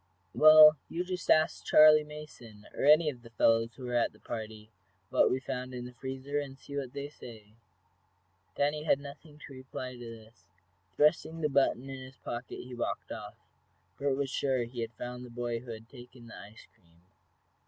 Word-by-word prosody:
"Well, 155 0 +8
you 175 +2 -2
just 180 -1 -6
ask 155 0 +3
Charley 155 0 +7
Mason, 145 -8 -12
or - - -2
any 155 +2 +6
of 125 -3 -15
the 115 - -14
fellows 115 0 +2
who 130 - -9
were 125 - -4
at 120 -1 +1
the - - -21
party, 110 -1 -7 0.4
what - - +4
we 130 - 0
found 130 -1 -5
in 125 0 -6
the 125 - -10
freezer, 135 +3 -4
and 135 -2 -7
see 140 - -10
what 135 -3 -4
they 140 0 -5
say." 110 -7 -13 1.0
Danny 145 +1 0
had 150 -3 +2
nothing 145 +2 -12
to 140 - -12
reply 130 -1 -7
to 125 - -12
this. 115 -5 -12 0.5
Thrusting 160 +2 +2
the 150 - +1
button 135 -2 +1
in 135 -1 -7
his 130 0 -12
pocket 120 +1 -7
he 125 0 -11
walked 120 - -4
off. - - -7 0.6
Bert 140 -1 0
was 140 -2 -2
sure 130 -4 0
he 120 0 -6
had 115 0 -5
found 125 +2 -7
the 125 - -10
boy 120 0 -3
who 125 +1 -14
had 110 0 -8
taken 120 -1 -14
the 115 - -11
ice 105 +3 -13
cream. 85 0 -29
130 Hz, 195 wpm, -30 LUFS, 115-145 Hz, 1.0 s, Well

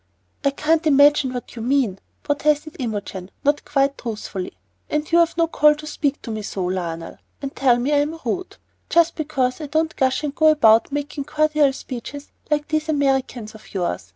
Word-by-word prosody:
"I 280 - +4
can't 315 +3 +1
imagine 285 -1 +5
what 245 -1 -7
you 230 - -6
mean," 240 -6 +1 0.2
protested 295 +1 0
Imogen, 205 -6 -4
not 290 +1 +2
quite 275 0 +1
truthfully. 210 -5 -5 0.4
"And 300 0 0
you've 340 0 +3
no 335 - +4
call 300 -2 +4
to 305 +1 -10
speak 290 -2 -2
to 230 - -5
me 215 -1 -3
so, 195 -2 -4
Lionel, 170 -3 -4 0.2
and 275 -1 -6
tell 255 -3 +4
me 260 +5 0
I - - +4
am 300 +3 -1
rude, 365 +10 -3 0.3
just 335 0 +4
because 270 -3 -1
I 300 - -5
don't 315 +2 0
gush 265 +1 +1
and 290 -2 -2
go 315 +1 +3
about 230 -6 +5
making 290 0 -4
cordial 305 -1 +2
speeches 265 +2 -8 0.2
like 295 -1 0
these 310 0 -1
Americans 265 -6 0
of 215 -1 -15
yours. 95 - -2
280 Hz, 180 wpm, -22 LUFS, 235-305 Hz, 0.4 s, imagine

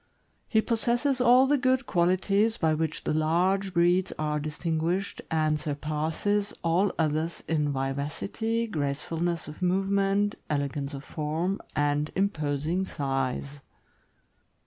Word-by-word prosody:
He 220 -1 +2
possesses 240 +3 +1
all 250 +1 +6
the 285 +1 +2
good 260 0 +2
qualities 195 +5 +2
by 160 -2 +2
which 160 0 -2
the - - 0
large 180 +5 +1
breeds 175 +1 +3
are 150 -1 -1
distinguished, 165 +5 -2
and 155 -1 +1
surpasses 155 +8 -1
all 175 +4 +2
others 160 +1 -1
in 150 -2 +1
vivacity, 145 - -2
gracefulness 165 0 -2
of 150 +3 -10
movement, 195 +2 +2 0.2
elegance 140 -1 -2
of 140 - -8
form, 160 +6 -2
and 145 +1 +1
imposing 160 -2 0
size. 135 -2 -2
165 Hz, 115 wpm, -27 LUFS, 150-200 Hz, 0.2 s, all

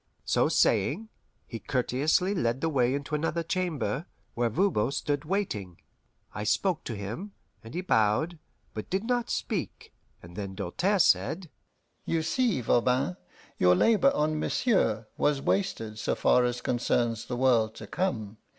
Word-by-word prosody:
So - - +2
saying, 175 - +2 0.4
he 115 - -7
courteously 135 - +1
led 120 -9 0
the 165 - 0
way 130 -3 +2
into 140 +1 -5
another 165 +2 0
chamber, 165 -3 -2 0.3
where 120 0 0
Voban 155 - +1
stood 145 +1 -2
waiting. 115 - -2 0.6
I 105 - -4
spoke 175 - +1
to 115 - -4
him, 115 - -6 0.3
and 115 +5 -10
he 180 - -1
bowed, 155 - +1 0.3
but 110 - -6
did 190 +2 -1
not 245 0 -1
speak; - - -4 0.3
and 85 0 -12
then 100 -1 -5
Doltaire 110 - 0
said: 170 -1 +2 0.5
"You 165 -1 -1
see, 230 - +1
Voban, 125 +8 +2 0.4
your 90 0 +5
labour 230 - +4
on 155 +1 +1
Monsieur 115 - +1
was 145 -2 +2
wasted 115 - -1
so - - 0
far 125 - +3
as 120 0 -2
concerns 120 -2 0
the 120 - -3
world 115 -4 +3
to 110 - -8
come. 110 - -2
135 Hz, 150 wpm, -28 LUFS, 110-180 Hz, 0.6 s, your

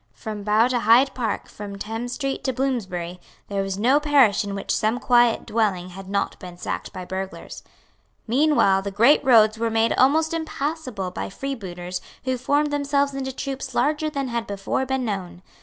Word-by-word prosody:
From 215 -2 -6
Bow 215 +3 +3
to 250 -1 +1
Hyde 235 +5 +5
Park, 230 -5 -3
from 200 -1 -8
Thames 225 +4 -4
Street 275 -2 -3
to 260 - 0
Bloomsbury, 190 -10 -2 0.3
there 200 -1 -1
was 195 0 -3
no 255 +7 +4
parish 280 -10 +4
in 200 -1 -4
which 195 - -2
some 220 +3 0
quiet 240 -2 +3
dwelling 200 -5 0
had 190 +1 -10
not 200 0 -1
been 180 -1 -10
sacked - - -4
by 185 - -7
burglars. 190 +1 -6 0.6
Meanwhile 245 -6 +3
the 200 - -4
great 230 +9 +4
roads 220 -3 +5
were 230 0 +1
made 225 0 +2
almost 315 +5 +3
impassable 290 - -3
by - - -5
freebooters 185 -8 -5 0.2
who 260 -1 -1
formed 290 +3 +1
themselves 285 -1 +1
into 265 -1 -3
troops 265 -1 -5
larger 310 +1 +1
than 275 -3 -3
had 235 -1 -3
before 200 +6 -2
been 265 -1 -1
known. 185 -4 -5
230 Hz, 175 wpm, -23 LUFS, 200-270 Hz, 0.6 s, Hyde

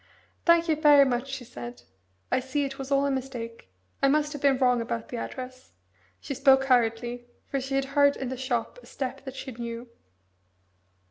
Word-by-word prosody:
"Thank 340 0 +5
you 315 - +3
very 295 -2 +7
much," 250 0 -1
she 270 -2 -5
said. 120 - -9 0.5
"I - - +3
see 265 +3 -1
it 270 0 -6
was 270 0 -5
all 275 0 +3
a 280 - +1
mistake. 245 - -5 0.3
I 275 - +5
must 300 +2 +2
have 290 - -7
been 275 -2 +4
wrong 250 -2 +3
about 230 0 -4
the 245 - -4
address." 255 +1 -7 0.5
She - - -5
spoke 270 0 +5
hurriedly 240 -1 +1 0.2
for 275 - -2
she 270 +1 -3
had 270 0 +1
heard 285 -1 +5
in 265 - -4
the 260 - -3
shop 250 - -2
a - - -17
step 270 0 -5
that 265 0 -7
she 265 0 -6
knew. 235 0 -6
265 Hz, 195 wpm, -27 LUFS, 240-275 Hz, 0.5 s, very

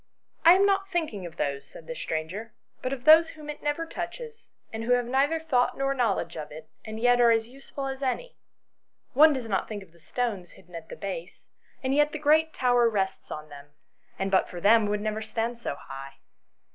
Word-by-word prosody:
"I 335 - +9
am 385 +2 +4
not 390 -1 +1
thinking 305 - -2
of 165 - -13
those," 140 -1 -2
said - - -13
the - - -5
stranger, 215 - -5
" - - -43
but 255 - -2
of 260 -2 -5
those 320 +1 +8
whom 300 -2 -8
it 295 - -11
never 295 +3 -1
touches, 450 +8 -7 0.2
and 220 0 -4
who 245 +2 +2
have 245 -1 +2
neither 275 +6 +1
thought 275 -6 +1
nor 275 0 +1
knowledge 210 -9 0
of 150 -2 -7
it, 155 +1 -11
and 220 0 -7
yet 245 +1 +4
are 235 - +6
as 225 -1 +2
useful 275 +2 -8
as 270 0 -4
any. 280 - -2 0.8
One 305 +4 +7
does 260 -5 -3
not 195 -3 -1
think 205 -2 -5
of 175 - -20
the 170 - -22
stones 200 -2 -3
hidden 180 -1 -19
at 165 -1 -8
the - - -7
base, 185 -3 -7 0.4
and 260 +1 0
yet 295 +1 +3
the - - -2
great 310 +2 +3
tower 245 -3 +3
rests 195 -3 -2
on 155 0 -7
them, 145 0 -13 0.4
and 195 0 -2
but 190 - +3
for 175 - -7
them 215 +3 +5
would 205 0 -1
never 215 0 -2
stand 225 +2 -3
so 145 - -4
high." 135 0 -9
240 Hz, 220 wpm, -27 LUFS, 195-295 Hz, 0.8 s, I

